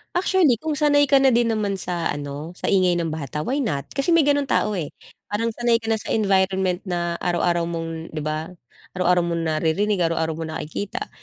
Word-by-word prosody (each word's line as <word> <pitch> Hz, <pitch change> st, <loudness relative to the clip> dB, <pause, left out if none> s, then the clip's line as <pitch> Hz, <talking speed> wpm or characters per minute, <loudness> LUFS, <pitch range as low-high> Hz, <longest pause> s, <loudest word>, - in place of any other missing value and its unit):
Actually, 355 Hz, -, +3 dB
kung 310 Hz, -2 st, -2 dB
sanay 290 Hz, -2 st, +3 dB
ka 275 Hz, -, +6 dB
na 270 Hz, -1 st, +4 dB
din 235 Hz, 0 st, +3 dB
naman 210 Hz, -3 st, 0 dB
sa 180 Hz, -3 st, -3 dB
ano, 145 Hz, +3 st, -6 dB
sa -, -, -3 dB
ingay 185 Hz, -2 st, +3 dB
ng 165 Hz, -, -2 dB
bata, 150 Hz, -1 st, -4 dB
why 265 Hz, -, -1 dB
not? 155 Hz, -, -2 dB
Kasi 275 Hz, +5 st, +2 dB
may 335 Hz, -, +6 dB
ganong 285 Hz, 0 st, +2 dB
tao, 210 Hz, -5 st, 0 dB
eh. 150 Hz, -4 st, -4 dB, 0.3 s
Parang 225 Hz, +3 st, -1 dB
sanay 235 Hz, 0 st, +1 dB
ka 225 Hz, -, -5 dB
na 225 Hz, -, +2 dB
sa -, -, -4 dB
environment 190 Hz, -3 st, +2 dB
na 175 Hz, -1 st, -2 dB
araw-araw 175 Hz, -1 st, 0 dB
mong 165 Hz, -1 st, -5 dB
'di 155 Hz, -, -3 dB
ba? 155 Hz, +3 st, -4 dB, 0.4 s
Araw-araw 180 Hz, -1 st, +2 dB
mong 170 Hz, -1 st, -1 dB
naririnig, 165 Hz, +6 st, 0 dB
araw-araw 160 Hz, -1 st, -1 dB
mo 165 Hz, -, -4 dB
nakikita. 195 Hz, -, -5 dB
185 Hz, 200 wpm, -23 LUFS, 165-230 Hz, 0.4 s, ka